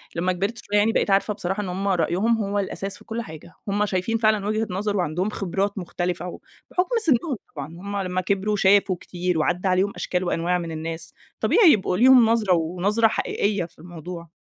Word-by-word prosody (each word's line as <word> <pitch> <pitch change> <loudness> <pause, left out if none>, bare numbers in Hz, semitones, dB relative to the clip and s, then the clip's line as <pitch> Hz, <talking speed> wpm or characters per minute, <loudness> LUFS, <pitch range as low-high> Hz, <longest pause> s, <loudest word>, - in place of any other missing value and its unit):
لمّا 180 +2 +1
كبِرت 200 +6 -2
شوية 205 - 0
يعني 210 +2 +4
بقيت - - 0
عارفة 200 +2 +2
بصراحة 200 0 -3
إن 190 - -5
هُم 195 +2 -3
رأيهم 190 +5 +1
هو 200 +1 -1
الأساس 195 0 -4
في 215 - -18
كل 230 +1 -4
حاجة، 160 -3 -11
هُم 205 +1 +1
شايفين 200 +4 -1
فعلًا 215 -2 +2
وجهة 215 +1 0
نظَر 200 +3 -1
وعندهم 180 +3 -1
خِبرات 200 +1 -2
مختلِفة 175 -1 -3
وبحُكم 360 - -4
سِنّهم 285 0 +2 0.2
طبعًا 140 -1 -5
هُم 195 +5 -6
لمّا 185 -1 -1
كبِروا 200 +3 0
شافوا 195 -1 +4
كتير 180 -1 -2
وعدّى 180 +4 0
عليهم 185 +2 +2
أشكال 180 0 -2
وأنواع 175 0 0
من 170 -2 -5
الناس، 160 +1 -5 0.3
طبيعي 395 -9 +5
يبقوا 190 -5 +1
ليهم 250 +1 +7
نظرة 215 -5 +3
ونظرة 180 +7 +2
حقيقية 205 -3 -1
في 165 - -18
الموضوع. 170 0 -9
195 Hz, 185 wpm, -23 LUFS, 175-210 Hz, 0.3 s, ليهم